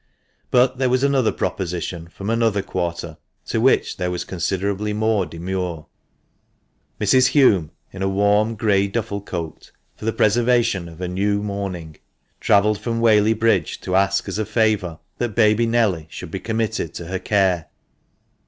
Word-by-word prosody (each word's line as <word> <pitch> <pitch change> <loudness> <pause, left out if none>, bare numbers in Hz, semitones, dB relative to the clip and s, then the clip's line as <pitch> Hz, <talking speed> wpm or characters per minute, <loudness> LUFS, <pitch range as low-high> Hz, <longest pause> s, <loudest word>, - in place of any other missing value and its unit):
But 125 +1 +3
there 130 -1 +2
was 130 +1 +1
another 135 -4 +2
proposition 85 -2 -3
from 100 +5 -5
another 115 -4 +1
quarter, 85 -3 -4 0.3
to - - -1
which - - +2
there 90 - -1
was 90 0 -3
considerably 100 +3 -2
more 105 -3 +1
demur. 85 -1 -4 1.1
Mrs. 130 +5 +3
Hulme, 100 - +4 0.2
in 95 - -8
a 95 - +1
warm, 105 +3 +2
grey 100 -2 +2
duffle 100 -1 -3
cloak, 85 -5 -6 0.2
for - - -10
the 115 - +2
preservation 115 -5 +2
of 80 - -13
her 90 +1 -4
new 100 +3 0
mourning, 95 -6 -5 0.4
travelled 105 +1 +3
from 115 -1 -2
VVhaley 110 -1 +4
Bridge, 115 +1 +1
to 90 - -2
ask 100 +1 +2
as 95 +2 -3
a 110 - 0
favour 105 -7 +1 0.2
that 120 -4 -2
baby 110 0 +3
Nelly 105 -9 +1
should - - -8
be - - -4
committed 110 -7 -2
to 85 - -6
her 95 +2 -3
care. 95 -5 +1
100 Hz, 155 wpm, -21 LUFS, 90-110 Hz, 1.1 s, Hulme